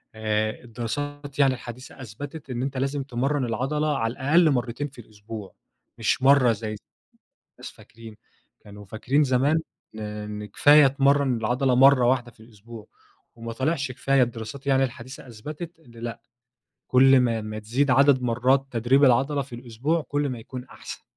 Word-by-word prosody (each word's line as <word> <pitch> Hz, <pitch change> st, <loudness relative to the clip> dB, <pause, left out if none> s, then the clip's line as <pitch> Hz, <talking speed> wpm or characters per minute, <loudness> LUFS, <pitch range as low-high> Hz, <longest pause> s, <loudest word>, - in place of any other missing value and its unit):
آآ 110 Hz, +1 st, -2 dB
الدراسات 145 Hz, +5 st, -6 dB
يعني 135 Hz, -2 st, +4 dB
الحديثة 125 Hz, +2 st, -10 dB
أثبتت 140 Hz, +6 st, -9 dB
إن 125 Hz, 0 st, -3 dB
أنتَ 135 Hz, 0 st, -3 dB
لازم 135 Hz, +1 st, -1 dB
تمرّن 135 Hz, +2 st, -1 dB
العضلة 140 Hz, +6 st, -1 dB
على 115 Hz, -1 st, -1 dB
الأقل 155 Hz, +5 st, +3 dB
مرتين 125 Hz, +3 st, -2 dB
في 130 Hz, -3 st, -13 dB
الأسبوع، 105 Hz, -1 st, -10 dB, 0.4 s
مش 115 Hz, +3 st, 0 dB
مرّة 135 Hz, -3 st, +5 dB
زي 110 Hz, 0 st, -4 dB
ما -, -, -5 dB, 0.9 s
الناس -, -, -8 dB
فاكرين، 115 Hz, -2 st, -14 dB, 0.5 s
كانوا 105 Hz, 0 st, -12 dB
فاكرين 125 Hz, +9 st, 0 dB
زمان 140 Hz, +5 st, +2 dB, 0.3 s
إن 110 Hz, -, -8 dB
إن 105 Hz, 0 st, -6 dB
كفاية 145 Hz, +7 st, +6 dB
تمرّن 140 Hz, -1 st, +2 dB
العضلة 125 Hz, +3 st, 0 dB
مرّة 135 Hz, -1 st, +6 dB
واحدة 120 Hz, -1 st, +1 dB
في 115 Hz, -, -26 dB
الأسبوع 110 Hz, 0 st, -13 dB, 0.5 s
وما 115 Hz, 0 st, -7 dB
طلعش 135 Hz, +1 st, -1 dB
كفاية 135 Hz, +1 st, +2 dB
الدراسات 120 Hz, +3 st, -4 dB
يعني 135 Hz, -1 st, +3 dB
الحديثة 130 Hz, +2 st, -8 dB
أثبتت 150 Hz, +10 st, -8 dB
إن 125 Hz, -, -20 dB
لأ، 115 Hz, 0 st, -7 dB, 0.7 s
كل 135 Hz, +1 st, +6 dB
ما 115 Hz, -3 st, 0 dB
ما 110 Hz, 0 st, -6 dB
تزيد 125 Hz, +6 st, 0 dB
عدد 135 Hz, -1 st, +4 dB
مرات 125 Hz, +3 st, +2 dB
تدريب 125 Hz, +4 st, +2 dB
العضلة 135 Hz, +3 st, +2 dB
في 130 Hz, -3 st, -8 dB
الأسبوع، 125 Hz, +7 st, -2 dB
كل 145 Hz, -1 st, -1 dB
ما 125 Hz, -, -5 dB
يكون 125 Hz, +3 st, -9 dB
أحسن. -, -, -10 dB
125 Hz, 160 wpm, -24 LUFS, 115-140 Hz, 0.9 s, كفاية